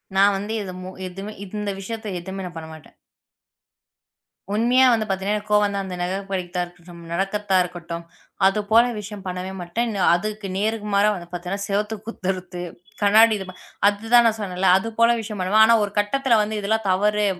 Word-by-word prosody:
நான் 200 +1 +5
வந்து 205 +3 -4
இதுமு 185 -1 -7 0.2
எதுமு 195 +4 -7
இந்த 210 +1 -4
விஷயத்துல 215 -2 -5
எதுவுமே 190 +1 -6
நான் 175 -2 -8
பண்ண 160 0 -8
மாட்டேன். 155 - -15 1.6
உண்மையாக 250 +4 +4
வந்து 220 -1 +1
பார்த்தீங்க 195 +1 -2
என்றால், 210 - +2
எனக்கு 210 0 -12
கோபம் 210 0 +5
வந்தால் 200 -1 -2
நமக்கு 180 +1 -2
பிடிக்காதது 180 -2 -3
தான் 175 0 0
இருக்கட்டும். 175 -1 -14
நடக்காததா 195 +2 0
இருக்கட்டும். 170 -1 -7 0.4
அது 195 +2 +3
போல 230 +1 +7
விஷயம் 210 -1 -7
பண்ணவே 185 +1 -4
மாட்டேன். 220 +6 -2 0.2
அதுக்கு 210 +2 -4
நேர்மாறாக 210 -1 +1
வந்து 175 -1 -8
பார்த்தீங்க 180 0 -5
என்றால், 200 0 -3
சுவற்றைக் 210 +1 -2
குத்துறது 185 -4 -4 0.4
கண்ணாடி 215 +2 +6
அ - - -11 0.4
அது 205 +2 -1
தான் 240 0 +8
நான் 225 - +1
சொன்னேன்ல. 190 -2 -1
அது 210 +4 -3
போல 230 0 +6
விஷயம் 210 -1 -6
பண்ணுவேன். 200 +4 +5
ஆனா 230 - +5
ஒரு 205 - -3
கட்டத்தில் 230 +3 +2
வந்து 215 +1 -2
இதெல்லாம் 220 +1 -1
தவறு. 210 +2 +2
200 Hz, 175 wpm, -23 LUFS, 185-215 Hz, 1.6 s, தான்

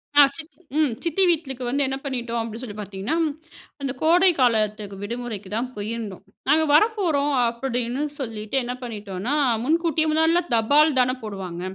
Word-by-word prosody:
அ 290 - +9 0.2
சித்தி 320 +1 -11 0.2
ம் 300 -6 +3
சித்தி 340 +3 +1
வீட்லுக்கு 275 -7 -1
வந்து 280 +4 +1
என்ன 270 0 -2
பண்ணிட்டோம் 240 -3 -2
அப்டி 225 0 -6
சொல்லி 225 -6 -7
பார்த்தீங்கன்னா, 200 +6 -3 0.7
அந்த 275 -1 -2
கோடை 355 +4 +5
காலத்துக்கு 215 -4 +1
விடுமுறைக்கு 225 -3 -5
தான் 245 +3 -1
போயிருந்தோம். 210 -2 -5 0.3
நாங்க 315 +2 +5
வரப்போறோம் 320 -6 +3
அப்டின்னு 245 +2 -2 0.2
சொல்லிட்டு 220 -2 -5
என்ன 245 +1 -3
பண்ணிட்டோனா, 210 0 -4 0.3
முன்கூட்டியே 320 +2 +1
முன்னாடிலாம் 325 +2 +2
தபால் 285 +6 +4
தானே 255 0 +3
போடுவாங்க. 190 -5 -6
250 Hz, 145 wpm, -23 LUFS, 220-305 Hz, 0.7 s, அ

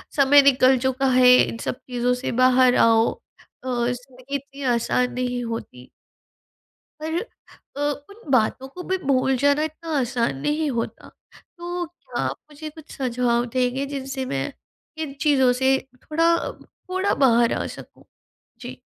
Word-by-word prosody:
समय 285 0 +6
निकल 260 -1 +5
चुका 265 +1 0
है 250 0 +7
इन 230 - +1
सब - - -2
चीज़ों 245 0 +1
से 250 +1 -3
बाहर 255 0 +5
आओ 225 0 +4 0.5
अ, - - -7
ज़िंदगी 250 +2 -3
इतनी 280 0 -7
आसान 250 +2 0
नहीं 250 -1 -2
होती। 180 - -7 1.1
पर 320 +2 -1 0.6
अ, - - -3 0.3
उन 400 -7 -14
बातों 255 +2 +1
को 360 +7 -9
भी 375 - +1
भूल 265 -4 +1
जाना 285 +3 +2
इतना 315 +1 -6
आसान 240 - -1
नहीं 300 0 0
होता। 235 -1 -4 0.5
तो 350 0 -4
क्या 345 +2 -7
आप - - -2
मुझे 310 +1 -8
कुछ 315 +1 -14
सुझाव 245 -2 0
देंगे 255 +2 0
जिनसे 265 -1 -4
मैं 135 - -3 0.5
इन 275 -3 -6
चीज़ों 270 -5 +4
से 265 +1 +2 0.3
थोड़ा, 330 +2 +1 0.4
थोड़ा 375 +2 0
बाहर 235 -3 +3
आ - - -2
सकूँ? - - -12 0.6
जी। - - -8
265 Hz, 145 wpm, -23 LUFS, 245-290 Hz, 1.1 s, है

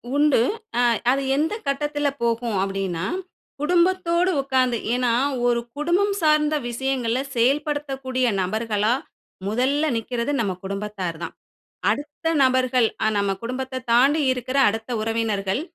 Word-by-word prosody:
உண்டு. 295 -2 +4 0.4
அ - - +4 0.3
அது 275 +1 +1
எந்த 310 +7 0
கட்டத்துல 290 +1 0
போகும் 230 -2 0
அப்டின்னா, 195 -3 -2 0.6
குடும்பத்தோடு 355 +2 +2
உட்கார்ந்து, 260 -3 +1 0.2
ஏன்னா 245 -1 +1 0.3
ஒரு 240 -1 +2 0.2
குடும்பம் 355 +7 +1
சார்ந்த 305 -1 +3
விஷயங்கள 250 -1 -1 0.2
செயல்படுத்தக்கூடிய 270 0 0 0.2
நபர்களா, 215 +3 0 0.5
முதல்ல 260 +8 +1
நிக்கிறது 235 +3 -2
நம்ம 200 -5 0
குடும்பத்தார் 195 -3 -4
தான். - - -5 0.6
அடுத்த 295 +3 -3 0.2
நபர்கள், 255 -2 +3 0.2
அ - - +4
நம்ம 200 -1 +1
குடும்பத்த 255 +2 -4
தாண்டி 275 +6 +4
இருக்கிற 255 +1 -2
அடுத்த 225 +2 -5
உறவினர்கள், 220 -1 -1
255 Hz, 115 wpm, -23 LUFS, 225-290 Hz, 0.6 s, உண்டு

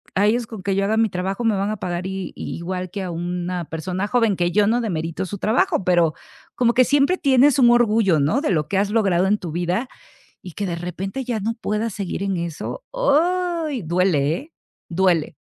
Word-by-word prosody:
A 200 +2 +3
ellos, 235 +2 +1
con 215 -4 -9
que 195 +1 0
yo 195 0 +1
haga 215 +2 +1
mi 225 -1 +3
trabajo, 190 +6 -3
me 225 -2 +2
van 200 +2 -1
a - - -2
pagar 175 -1 -4
i 190 -1 -5
igual 180 +2 -4
que 195 +2 -5
a 180 - -4
una 175 0 -3
persona 180 +5 -3
joven, 230 -3 +2
que 175 0 +1
yo 205 +2 +3
no 230 +3 +2
demerito 170 -5 -3
su 200 +2 -6
trabajo, 315 - +1
pero 175 -3 +3 0.4
como 240 -1 +2
que 255 +1 +5
siempre 285 +7 +3
tienes 275 -1 +4
un 240 - +6
orgullo, 220 -7 +3
¿no?, 150 - +2
de 295 - -1
lo 155 -4 0
que 195 - 0
has 200 +1 +1
logrado 195 -5 +2
en 210 +2 +2
tu 175 -6 -6
vida, 180 +9 -1 0.5
y 180 - -9
que, 200 +5 -3
de 175 - -2
repente, 190 +9 -5
ya 235 -3 -2
no 225 +3 -2
puedas 220 -1 -2
seguir 195 -1 -4
en 195 -1 -1
eso, 170 - -5
íay!, 345 - +1
duele, 165 -3 +1
¿eh?, 300 - -10 0.4
duele. 175 -4 +1
195 Hz, 215 wpm, -22 LUFS, 180-235 Hz, 0.5 s, un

